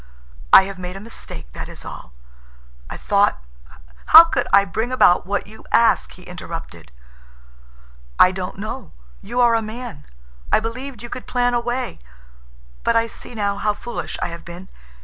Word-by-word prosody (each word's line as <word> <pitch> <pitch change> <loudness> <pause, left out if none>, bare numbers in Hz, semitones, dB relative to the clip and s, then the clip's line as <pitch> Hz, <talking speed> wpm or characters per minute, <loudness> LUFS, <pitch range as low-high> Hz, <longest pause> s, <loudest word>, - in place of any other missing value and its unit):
I - - +10
have 195 -1 -7
made 180 0 -6
a - - -7
mistake, 140 - -9
that - - -7
is - - -11
all. 60 - -9 0.8
I - - -6
thought—" 205 0 +2 0.7
"How 325 +1 +11
could 270 -7 -1
I 200 0 +6
bring 220 +5 -3
about 180 -8 +4
what 205 +1 -1
you 220 +2 -14
ask?" 230 - +3
he 180 - -15
interrupted. 165 - -9 1.3
"I 185 - +7
don't 185 0 -5
know. 215 0 -7 0.3
You 240 +5 -4
are 240 -1 +5
a 225 - +2
man. 215 - -8 0.4
I - - +5
believed 240 +2 -6
you 240 - -7
could 255 - -7
plan 245 0 +1
a 240 - +2
way, 245 +2 -3 0.8
but 235 - +2
I 230 0 +3
see 230 +1 -9
now 200 -2 -1
how 210 0 0
foolish 240 +3 -6
I - - -1
have 170 0 -9
been. 175 +2 -10
210 Hz, 170 wpm, -21 LUFS, 185-240 Hz, 1.3 s, How